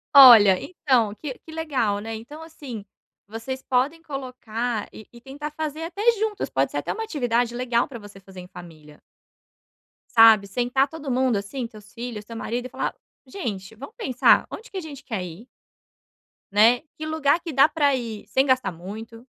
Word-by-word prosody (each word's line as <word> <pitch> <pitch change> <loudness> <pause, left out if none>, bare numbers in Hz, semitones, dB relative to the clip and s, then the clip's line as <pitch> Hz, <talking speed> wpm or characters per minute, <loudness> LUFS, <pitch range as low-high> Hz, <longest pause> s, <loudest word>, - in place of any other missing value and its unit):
Olha, 225 -9 +10
então 255 - +1
que 280 +3 -6
que 320 - -14
legal, 275 -10 -1
né, 225 +2 -6
então, 290 +9 -10
assim, 275 -10 -9 0.4
vocês 225 +5 -6
podem 270 +5 0
colocar 245 -6 -4
e 220 - -12
e 240 - -14
tentar 275 +4 -7
fazer 310 0 -5
até 360 +5 -5 0.2
juntos, 430 -1 -2
pode - - +1
ser - - -5
até - - -2
uma 450 - -4
atividade 245 - 0
legal 240 -1 +1
pra 270 - -8
você 205 -2 -13
fazer 190 -1 -13
em 180 - -12
família. 155 -5 -13 1.1
Sabe, 225 -3 +8
sentar 245 +6 +1
todo 300 -1 -8
mundo, 255 -3 +2
assim, 235 +6 -4
teus 215 -3 -13
filhos, 235 -3 -6
teu 230 +2 -10
marido 245 +2 -3
e - - -18
falar: - - -3 0.3
"Gente, 225 - -6
vamos 280 - -11
pensar 260 - +4
onde 470 - -9
que 390 - -7
a - - -3
gente 290 -4 -10
quer 215 -8 -4
ir?". 180 +8 -10 1.0
Né? 225 +4 +5 0.2
Que 310 - -5
lugar 310 0 +2
que 340 - -6
dá 275 +2 +6
pra 290 -4 +2
ir 230 -4 -6
sem 265 - +2
gastar 255 -7 +2
muito? 220 +7 -9
245 Hz, 180 wpm, -24 LUFS, 215-285 Hz, 1.1 s, Olha